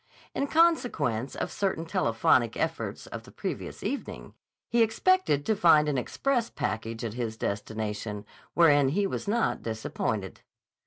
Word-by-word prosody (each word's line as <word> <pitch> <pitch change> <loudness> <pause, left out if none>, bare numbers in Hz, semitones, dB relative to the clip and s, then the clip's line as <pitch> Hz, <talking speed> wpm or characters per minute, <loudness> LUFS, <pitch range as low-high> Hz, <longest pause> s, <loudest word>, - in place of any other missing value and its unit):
In 280 - -1
consequence 245 - +2
of - - -3
certain 190 -5 -1
telephonic 165 - +2
efforts - - -3
of - - -7
the - - -15
previous - - -5
evening, 280 - -5 0.3
he 235 - +2
expected 225 - +2
to 220 - +2
find 160 -5 +5
an 145 - 0
express 245 - -1
package 115 +1 -3
at 110 - -4
his 115 -2 -3
destination, 105 0 -4 0.3
wherein 145 -5 +5
he 200 +8 +1
was 195 - -3
not 230 +3 +1
disappointed. 110 -3 -3
150 Hz, 140 wpm, -28 LUFS, -, 0.3 s, find